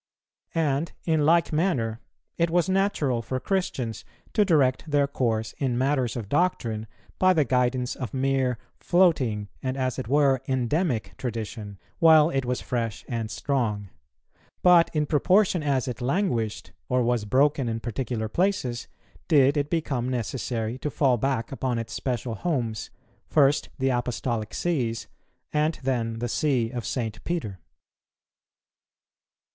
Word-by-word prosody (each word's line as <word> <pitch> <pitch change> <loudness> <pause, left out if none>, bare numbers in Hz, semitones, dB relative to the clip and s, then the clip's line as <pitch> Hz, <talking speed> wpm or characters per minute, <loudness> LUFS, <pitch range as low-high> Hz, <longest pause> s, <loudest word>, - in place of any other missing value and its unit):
And, 155 -1 0
in 155 -3 +2
like 170 0 +3
manner, 130 -10 0 0.4
it 170 0 +1
was 175 +1 +2
natural 185 -11 +1
for 130 +3 -3
Christians 130 - -2 0.3
to 210 - +4
direct 150 -5 +2
their 145 -1 +3
course 115 -5 -1
in 130 -4 0
matters 130 -2 +1
of 115 -5 -4
doctrine 115 - 0 0.3
by 185 0 +5
the 155 -5 +2
guidance 125 0 +1
of 125 -6 -5
mere 130 -2 +1 0.2
floating, 135 - +2
and, 130 0 -2
as 130 -1 -1
it 130 - -4
were, 135 -1 +3
endemic 130 - 0
tradition, 110 -4 -5 0.2
while 160 -1 +6
it 135 -1 -1
was 125 0 -1
fresh 115 -4 -3
and 115 -3 -3
strong; 110 -3 -1 0.7
but 175 -2 +6
in 150 -1 +2
proportion 185 +5 +3
as 140 -3 0
it 125 0 -5
languished, 125 - -1 0.2
or 125 -1 +2
was 120 -2 +1
broken 135 +3 +2
in 115 0 -2
particular 120 -1 -3
places, 130 - -1 0.4
did 145 -3 +5
it 145 0 0
become 135 -7 -1
necessary 120 -1 -3
to 150 - -2
fall 135 -3 +2
back 130 -1 -1
upon 130 -3 -1
its 115 -1 -5
special 125 -2 -2
homes, 120 -7 -2 0.4
first 145 -1 +3
the 135 0 +1
Apostolic 120 -3 -2
Sees, 125 -10 -1 0.5
and 155 +1 +1
then 115 -4 -1
the 120 +1 -2
See 120 -3 0
of 120 -5 -4
St. 115 -4 -3
Peter. 110 - -3
130 Hz, 140 wpm, -26 LUFS, 115-150 Hz, 0.7 s, while